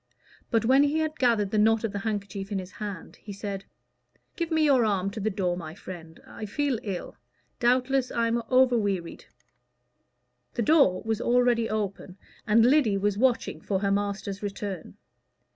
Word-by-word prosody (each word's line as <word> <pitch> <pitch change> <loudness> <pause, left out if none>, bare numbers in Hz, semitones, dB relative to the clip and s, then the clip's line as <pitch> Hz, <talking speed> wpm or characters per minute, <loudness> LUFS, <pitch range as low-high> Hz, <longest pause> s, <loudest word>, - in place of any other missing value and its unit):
But 225 -2 +1
when 265 +4 +5
he 290 +2 +2
had 315 0 -2
gathered 230 -6 +2
the 215 - +2
knot 225 +1 +3
of 225 - -1
the 205 - -4
handkerchief 200 -2 -4
in 200 - -1
his 185 0 -6
hand 200 -5 -7
he 210 - -10
said 195 -1 -5 0.7
"Give 335 -2 -2
me 320 -1 +2
your 270 -5 +4
arm 200 -3 0
to 220 - -6
the 215 +1 0
door, 190 -3 -1
my 165 -2 -7
friend. 165 -4 -10
I 215 - -8
feel 275 +2 -1
ill. 195 -4 -6 0.4
Doubtless 255 +2 +2
I 235 - 0
am 235 +1 0
over 255 -1 +5
wearied." 195 -5 -3 1.3
The 235 - 0
door 245 - +4
was 220 -1 -1
already 240 -1 +2
open, 200 -3 -4 0.3
and 225 +2 +5
Lyddy 250 -6 +4
was 205 0 0
watching 255 -1 +1
for 195 -2 -1
her 200 -1 +1
master's 200 0 -2
return. 195 - -5
215 Hz, 175 wpm, -27 LUFS, 195-245 Hz, 1.3 s, when